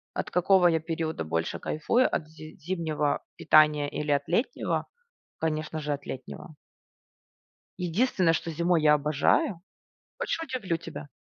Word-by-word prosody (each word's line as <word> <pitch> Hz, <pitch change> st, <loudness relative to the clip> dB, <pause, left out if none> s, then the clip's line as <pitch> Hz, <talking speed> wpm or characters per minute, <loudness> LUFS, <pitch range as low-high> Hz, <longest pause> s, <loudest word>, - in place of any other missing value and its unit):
от -, -, -3 dB
какого 180 Hz, 0 st, +4 dB
я 165 Hz, -1 st, +3 dB
периода 160 Hz, -, -3 dB
больше 80 Hz, +1 st, -2 dB
кайфую, 230 Hz, +12 st, +1 dB
от 155 Hz, -, -1 dB
зи 155 Hz, 0 st, -12 dB
зимнего 155 Hz, -4 st, -1 dB
питания 150 Hz, -1 st, +4 dB
или 150 Hz, +1 st, -4 dB
от 140 Hz, -1 st, +2 dB
летнего? 230 Hz, -, -1 dB, 0.5 s
Конечно 155 Hz, 0 st, -2 dB
же, 150 Hz, -1 st, -2 dB
от 140 Hz, -, -7 dB
летнего. 135 Hz, +4 st, -8 dB, 1.2 s
Единственное, 180 Hz, -1 st, +2 dB
что 165 Hz, 0 st, -2 dB
зимой 170 Hz, +1 st, +1 dB
я 150 Hz, -1 st, +6 dB
обожаю. 155 Hz, -, +1 dB, 0.6 s
Хочешь, 330 Hz, -, -2 dB
удивлю 240 Hz, -, -2 dB
тебя? 165 Hz, -3 st, -9 dB
160 Hz, 135 wpm, -27 LUFS, 150-180 Hz, 1.2 s, я